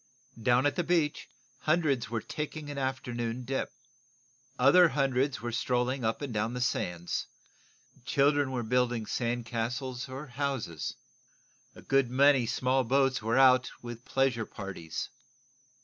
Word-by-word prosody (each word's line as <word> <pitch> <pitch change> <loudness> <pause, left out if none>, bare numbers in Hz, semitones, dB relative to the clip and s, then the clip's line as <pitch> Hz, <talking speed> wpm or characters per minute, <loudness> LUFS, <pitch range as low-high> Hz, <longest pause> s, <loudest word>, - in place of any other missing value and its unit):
Down 125 +3 +3
at 145 - +1
the 175 - +1
beach 160 -3 0 0.3
hundreds 150 -8 +1
were 115 -1 -2
taking 150 -1 -5
an 140 - -4
afternoon 125 -2 -3
dip. 135 +2 -2 0.9
Other 165 +7 +6
hundreds 135 -1 0
were 120 - -2
strolling 125 +2 0
up 110 +5 -1
and 135 -4 -4
down 110 +3 -1
the - - -3
sands. 90 -8 -2 0.8
Children 145 +1 +2
were 125 -2 -2
building 120 -1 +1
sand 120 +1 -2
castles 125 +3 -3
or 135 +3 -6
houses. 130 - -3 0.8
A - - -13
good 135 -2 +2
many 135 -1 +4
small 130 +2 +1
boats 130 0 +2
were 115 +3 0
out 130 -1 +6
with 120 0 -7
pleasure 130 -5 0
parties. 95 -6 -6
125 Hz, 135 wpm, -30 LUFS, 120-135 Hz, 0.9 s, Other